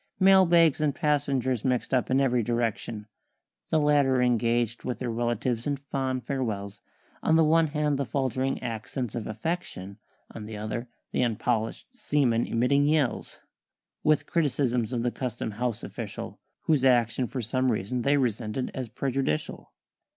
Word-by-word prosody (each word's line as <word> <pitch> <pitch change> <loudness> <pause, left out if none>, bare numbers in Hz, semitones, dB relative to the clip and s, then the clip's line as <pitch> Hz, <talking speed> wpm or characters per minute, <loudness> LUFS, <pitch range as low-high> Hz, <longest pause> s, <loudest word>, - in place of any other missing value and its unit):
Mail 190 -1 +6
bags 165 -3 +4
and 150 -3 +1
passengers 140 -6 0
mixed 125 0 0
up 130 - +2
in 130 +1 +3
every 125 -3 +2
direction, 115 -2 -2 0.6
The 160 - +2
latter 145 -3 +3
engaged 120 -1 +1
with 125 - -3
their 125 -2 -3
relatives 120 +1 -1
in 145 -1 0
fond 135 -2 -3
farewells; 105 -7 -3 0.4
On 160 - +3
the 160 - +5
one 160 +1 +4
hand 150 -1 0
the 140 - 0
faltering 130 +1 -1
accents 120 +1 -4
of 115 -3 -4
affection, 110 - -4 0.3
On 110 - -8
the 110 -1 -6
other 110 +3 -4 0.2
the - - -1
unpolisht 115 - -1
seamen 130 - +1
emitting 140 +5 +2
yells, 150 -5 0 0.6
With 155 0 +3
criticisms 130 -8 0
of 120 -1 -1
a 120 - +1
Custom 120 -3 -4
House 120 +1 -3
official - - -7 0.2
Whose 150 -5 +2
action 120 -1 +3
for 125 -1 -4
some 130 +3 +1
reason 110 +4 -2
they 140 +4 +3
resented 120 -1 -1
as 130 -3 -5
prejudicial. 135 - -2
125 Hz, 150 wpm, -27 LUFS, 115-140 Hz, 0.6 s, Mail